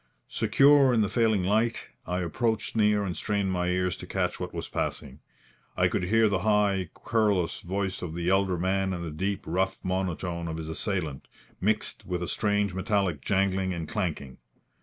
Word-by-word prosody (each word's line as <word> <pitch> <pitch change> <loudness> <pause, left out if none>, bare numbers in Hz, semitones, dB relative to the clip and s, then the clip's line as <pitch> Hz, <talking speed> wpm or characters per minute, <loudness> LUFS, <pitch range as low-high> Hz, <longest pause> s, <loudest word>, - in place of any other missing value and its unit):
Secure 140 -1 +5
in 110 - +3
the 105 - +1
failing 110 -5 +2
light, 110 +5 0 0.2
I 90 +1 -1
approached 110 +7 -1
near 105 -1 +3
and 90 -3 -3
strained 100 -2 -1
my 90 -1 0
ears 90 0 0
to - - -9
catch - - -1
what - - -4
was - - -5
passing. 70 +1 -4 0.6
I - - +4
could 90 - -1
hear 110 +4 +4
the 100 -2 +1
high, 100 -3 +2
querulous 105 -6 +1
voice 95 +1 -3
of 85 -2 -5
the 85 0 -3
elder 95 -1 +2
man 95 +2 0
and 85 -1 -4
the 80 - -5
deep, 95 +6 -2
rough 95 +3 -1
monotone 90 -2 -2
of 80 0 -4
his 80 -1 -6
assailant, 80 -4 -3 0.3
mixed 105 +2 0
with 90 -1 -2
a - - -3
strange 105 -2 0
metallic 95 -4 0
jangling 95 0 +1
and 80 -2 -5
clanking. 80 - -3
95 Hz, 180 wpm, -27 LUFS, 90-105 Hz, 0.6 s, Secure